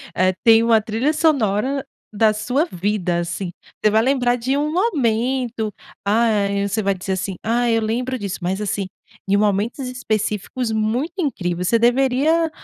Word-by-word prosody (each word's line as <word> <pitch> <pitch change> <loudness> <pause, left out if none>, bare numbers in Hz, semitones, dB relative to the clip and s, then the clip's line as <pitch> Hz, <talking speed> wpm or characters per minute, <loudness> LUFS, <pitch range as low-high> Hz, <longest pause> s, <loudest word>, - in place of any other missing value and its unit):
eh, 185 0 +2
tem 225 -1 +6
uma 230 -2 +4
trilha 225 +8 0
sonora 275 -4 +1 0.3
da 215 +1 +3
sua 245 +9 0
vida, 180 - -1
assim, 175 +1 -4 0.3
você 215 - +4
vai 220 - +4
lembrar 245 -1 +2
de 260 +4 -1
um 300 +1 0
momento, 250 - 0 0.3
ah, 215 -1 +2 0.2
você 215 +2 -1
vai 195 -1 0
dizer, 190 +1 -5
assim: 190 0 -2
"Ah, 240 +2 +1
eu 225 0 +3
lembro 250 +4 -1
disso", 200 -3 -5
mas, 185 +3 -1
assim, 200 -2 -2 0.4
de 200 - +4
momentos 210 +6 0
específicos 225 -1 -2
muito 220 +8 -1
incrível. 180 - -2
Você 205 +6 +3
deveria 270 +7 +2
225 Hz, 155 wpm, -20 LUFS, 205-255 Hz, 0.4 s, tem